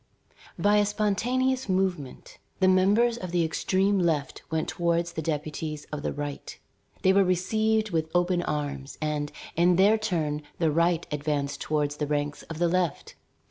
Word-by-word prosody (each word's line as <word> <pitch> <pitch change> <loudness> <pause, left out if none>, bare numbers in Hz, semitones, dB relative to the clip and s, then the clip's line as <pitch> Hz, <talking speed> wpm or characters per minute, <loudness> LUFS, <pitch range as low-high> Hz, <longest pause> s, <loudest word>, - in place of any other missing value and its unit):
By 205 +1 +3
a 205 - +4
spontaneous 245 +5 0
movement, 185 -7 -2 0.2
the 190 - +4
members 205 +6 +4
of 185 - -5
the 170 -1 +1
extreme 190 +4 +1
left 155 -6 0
went 160 0 -1
towards 170 0 0
the 160 - -4
deputies 150 0 -4
of 150 -1 -4
the - - -2
right. 145 -1 -6 0.5
They 190 - +5
were 195 0 +5
received 215 +4 +1
with 160 -1 -1
open 175 0 +2
arms, 145 -4 -4
and, 150 -1 -2 0.2
in 175 +2 +4
their 205 +4 +5
turn, 160 -8 -1 0.2
the 165 -3 +2
right 170 +1 +2
advanced 145 -1 -2
toward 150 -2 0
the 150 0 -3
ranks 145 0 -2
of 165 - -8
the 175 +1 +2
left. 175 -3 -1
170 Hz, 160 wpm, -27 LUFS, 150-195 Hz, 0.5 s, They